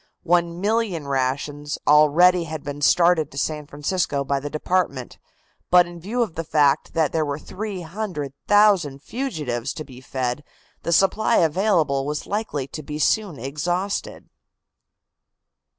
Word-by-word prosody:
One 170 0 +1
million 205 -7 -1
rations 140 +2 -2
already 165 +4 +5
had 155 -2 -6
been 145 0 -6
started 170 0 +4
to 140 - -12
San 150 +1 -2
Francisco 145 -1 -1
by 140 0 -1
the 145 +2 -5
department. 155 -5 -2 0.5
But 180 0 +6
in 175 0 -10
view 225 +8 -1
of 205 -8 -5
the 165 - -4
fact 150 -2 +2
that 160 -3 +2
there 160 - +1
were 145 -1 -3
300,000 185 -3 0
fugitives 145 - -4
to 155 - -5
be 130 -3 -13
fed 130 +1 -3 0.4
the 170 - -3
supply 210 +6 +3
available 160 -5 +2
was 150 0 -3
likely 205 -10 -3
to 155 - -7
be 150 +1 -6
soon 180 +2 +1
exhausted. 175 +10 -3
155 Hz, 135 wpm, -23 LUFS, 145-180 Hz, 0.5 s, But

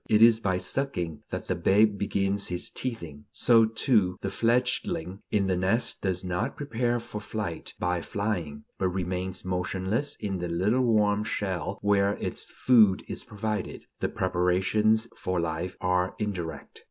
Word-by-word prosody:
It 110 0 +6
is 115 -1 +7
by 95 -4 0
sucking 90 - -3
that - - -4
the - - 0
babe 105 +1 +3
begins 100 0 0
his 90 0 -3
teething. 85 - -5
So, 115 -2 +5
too, 110 -5 +2
the - - -2
fledgling 115 -6 0
in 100 -2 +2
the 95 -1 +1
nest 95 +7 +1
does 95 -2 -1
not 90 +8 -2
prepare 120 -3 0
for 105 -2 -7
flight 105 -5 -5
by 90 -1 0
flying, 85 -8 -3 0.2
but 95 - +2
remains 90 0 -3
motionless 95 +9 -1
in 100 -3 -3
the 90 0 -3
little 100 +9 +2
warm 105 -3 +3
shell 95 -3 -2
where 100 0 +3
its - - -3
food 110 -7 +4
is - - -5
provided. 105 -1 -4
The - - 0
preparations 95 +5 +2
for 90 -1 -2
life 85 +2 -3
are 90 0 +1
indirect. 90 -8 -5
100 Hz, 155 wpm, -27 LUFS, 90-110 Hz, 0.2 s, is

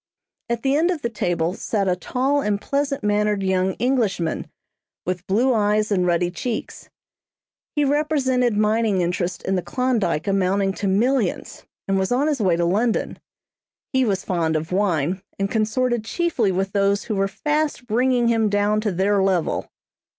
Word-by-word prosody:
At 235 -1 -2
the 270 0 +2
end 325 +4 +2
of 340 -5 -2
the 235 - -1
table 175 -5 -1
sat 200 0 -2
a 180 - +2
tall 265 +9 0
and 210 -5 0
pleasant 275 +1 -2
mannered 210 -1 +1
young 190 0 +1
Englishman, 220 -10 -1 0.6
with 180 0 -3
blue 240 +7 +2
eyes 210 -1 +1
and 180 -3 +2
ruddy 175 0 +1
cheeks. 225 +5 -5 0.9
He 295 -1 +2
represented 270 -5 +1
mining 215 -2 +2
interests 175 +1 -2
in 190 - 0
the 180 - 0
Klondyke 230 -10 -1
amounting 195 0 +1
to 200 - -3
millions, 220 +1 0 0.2
and 195 0 +1
was 190 +3 -1
on 260 +4 +2
his 295 -5 0
way 185 -4 +3
to 170 0 0
London. 215 +7 0 0.7
He 260 0 +3
was 195 -5 -1
fond 165 -3 0
of 155 +2 -3
wine, 180 -2 0 0.2
and 195 0 -2
consorted 235 +1 0
chiefly 250 - 0
with 190 +1 -1
those 200 0 +1
who 215 - -3
were 195 0 +1
fast 295 +5 -1
bringing 245 +1 +2
him 225 -2 +2
down 205 +1 +1
to 215 -2 -1
their 195 +2 +1
level. 190 -4 0
210 Hz, 165 wpm, -22 LUFS, 190-250 Hz, 0.9 s, way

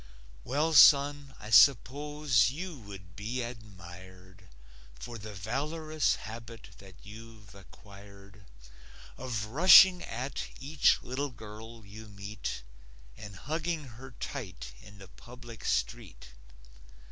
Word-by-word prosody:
Well, 150 - -1
son, 140 -1 +5
I 105 +1 -10
suppose 140 -1 +4
you 170 +6 -7
would 95 -4 -13
be 120 +5 -4
admired 95 -4 -12 0.5
For 115 - -9
the 105 +1 -9
valorous 155 - -2
habit 115 0 -10
that 95 -2 -15
you've 110 0 -13
acquired 100 0 -16 0.7
Of 120 -5 -4
rushing 180 - +7
at 130 +4 -5
each 140 +2 +2
little 135 +3 -4
girl 110 -1 -12
you 110 +2 -12
meet 100 - -7 0.5
And 100 -2 -11
hugging 160 - -4
her 125 +4 -12
tight 90 - -7
in 100 0 -15
the 95 -1 -13
public 120 +2 -13
street. - - -3
115 Hz, 110 wpm, -29 LUFS, 100-140 Hz, 0.7 s, rushing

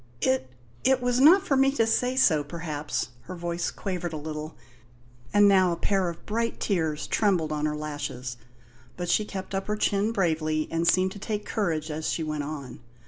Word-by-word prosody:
"It 130 0 +1 0.3
it 265 -1 +4
was 245 0 +1
not 355 +8 +7
for 275 - +2
me 270 0 +4
to 230 -5 +2
say 250 +3 +1
so, 160 - +4
perhaps." 150 -3 -4 0.2
Her 185 - -7
voice 170 0 -2
quavered 180 -4 -4
a - - -3
little, 155 +1 -6 0.7
and 205 0 +6
now 190 -2 +5
a - - 0
pair 190 0 +1
of 170 - -9
bright 230 +2 -1
tears 160 -6 0
trembled 180 -8 +1
on 150 0 0
her 150 - -2
lashes; 145 -5 -5 0.6
but 175 -1 -3
she 215 - +3
kept 190 -1 -6
up 195 0 -2
her 210 - 0
chin 205 +1 +1
bravely 155 -6 0
and 165 +1 0
seemed 185 +1 +3
to 205 - -9
take 210 0 -3
courage 165 -7 -1
as 155 +1 -3
she 165 - -1
went 155 -1 -2
on. 145 -3 -7
175 Hz, 195 wpm, -27 LUFS, 155-205 Hz, 0.7 s, not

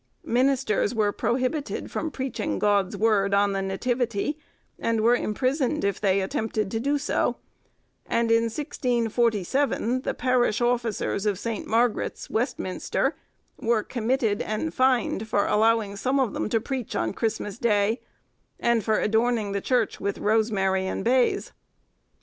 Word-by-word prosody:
Ministers 250 -3 +1
were 210 -2 +2
prohibited 255 +7 -2
from 320 - -2
preaching 260 -6 -3
God's 200 -1 +1
word 200 -2 +2
on 200 0 +3
the 195 - -1
Nativity, 235 +6 -1 0.4
and 225 -1 0
were 235 +2 +5
imprisoned 260 +6 0
if 200 -1 -1
they 195 -1 +2
attempted 215 +1 -2
to 225 - -1
do 285 +5 +1
so; 285 - 0 0.7
and 230 0 +1
in 230 0 +4
1647 240 - 0
the - - -3
parish 245 -3 +2
officers 235 -4 0
of 205 -3 +1
St. 225 +1 -4
Margaret's, 230 0 0
Westminster, 225 -5 -1 0.4
were 225 -2 +1
committed 230 -3 0
and 210 -7 -2
fined 250 -4 +1
for 205 -2 +1
allowing 220 -1 +2
some 260 +7 0
of 255 -6 +1
them - - -2
to 225 - +2
preach 255 0 -4
on 110 0 -1
Christmas 220 -1 -3
Day, 220 0 +2 0.6
and 235 -2 +2
for 215 +1 +1
adorning 220 -1 +1
the 200 0 -2
Church 245 -1 0
with 200 - -2
rosemary 200 -3 +1
and - - -3
bays. 250 +1 +2
225 Hz, 140 wpm, -25 LUFS, 205-245 Hz, 0.7 s, were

